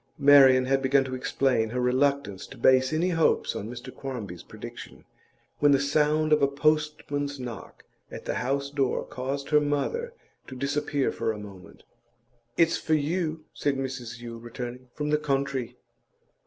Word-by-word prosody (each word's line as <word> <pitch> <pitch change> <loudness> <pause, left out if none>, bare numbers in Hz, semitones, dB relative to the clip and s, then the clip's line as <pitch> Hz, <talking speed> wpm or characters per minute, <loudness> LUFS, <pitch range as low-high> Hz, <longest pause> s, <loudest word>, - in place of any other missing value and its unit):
Marian 135 -3 +7
had 135 +1 +1
begun 135 +1 +3
to 130 -1 -6
explain 125 -3 0
her 125 +3 -3
reluctance 130 -4 0
to 135 - -12
base 130 +2 +4
any 165 +4 +1
hopes 165 -2 +1
on 105 - -5
Mr 120 +1 -8
Quarmby's 110 -11 -6
prediction, - - -10 0.5
when 145 -1 +5
the 135 - +4
sound 150 +2 +2
of 150 - +4
a 140 - +5
postman's 145 -1 0
knock 120 -7 -8 0.3
at - - -9
the - - -1
house 140 +2 -1
door 135 -3 0
caused 135 +3 -5
her 150 0 +5
mother 465 - -2 0.3
to 130 - -8
disappear 140 +1 -1
for - - -1
a 110 - -6
moment. 100 -2 -12 0.7
'It's 165 0 +4
for 160 - +1
you,' 155 +1 -1
said 145 -1 0
Mrs 125 -3 -5
Yule, 115 -1 -8
returning. 120 +2 -7
'From 150 0 -2
the 150 - +3
country. 135 -4 -2
135 Hz, 160 wpm, -27 LUFS, 125-150 Hz, 0.7 s, Marian